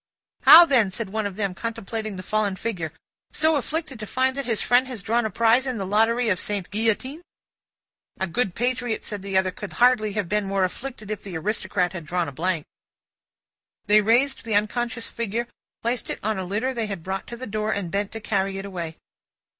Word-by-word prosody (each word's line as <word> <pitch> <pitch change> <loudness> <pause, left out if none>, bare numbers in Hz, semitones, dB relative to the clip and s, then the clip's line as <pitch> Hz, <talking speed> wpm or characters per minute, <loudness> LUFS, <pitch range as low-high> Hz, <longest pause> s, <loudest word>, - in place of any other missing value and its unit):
"How, 340 +2 +11
then?" 250 - +3
said 190 +1 -5
one 215 -1 -1
of 195 - -8
them, 200 -2 -1
contemplating 220 0 -4
the 185 - -7
fallen 210 -1 0
figure. 185 -6 -3 0.4
"So 315 +1 +4
afflicted 295 -2 -2
to 215 - -6
find 260 +3 +1
that 275 -3 -4
his 225 -3 +1
friend 245 +1 +3
has 245 -6 -6
drawn 230 0 +1
a - - -5
prize 230 +4 +3
in 255 -2 -2
the 195 - -3
lottery 225 +4 +2
of 185 -3 +1
Sainte 200 -3 -3
Guillotine?" 225 +8 0 1.0
"A 190 - +1
good 190 0 -1
patriot," 245 -1 -1
said 205 -2 -5
the 195 -1 -1
other, 190 0 +2
"could 205 +2 -8
hardly 240 -4 +3
have 205 -3 -1
been 210 +3 0
more 195 0 0
afflicted 215 +2 -4
if 215 - -4
the 185 -5 -6
Aristocrat 190 0 -1
had 170 -4 -7
drawn 175 +1 0
a - - -5
blank." 165 +2 -1 1.2
They 210 +1 +6
raised 245 +6 +2
the 225 -2 -1
unconscious 230 +3 0
figure, 235 +1 -3 0.4
placed 235 +1 -1
it - - -3
on 215 -1 0
a 185 - -3
litter 215 +8 -1
they 230 -3 -2
had 195 -5 -5
brought 190 +2 -4
to 235 - -7
the 255 - -6
door, 215 0 -2
and 195 -5 -2
bent 200 +1 -1
to 225 - -5
carry 195 -2 -1
it 195 - -5
away. 170 -5 -5
215 Hz, 210 wpm, -24 LUFS, 195-240 Hz, 1.2 s, How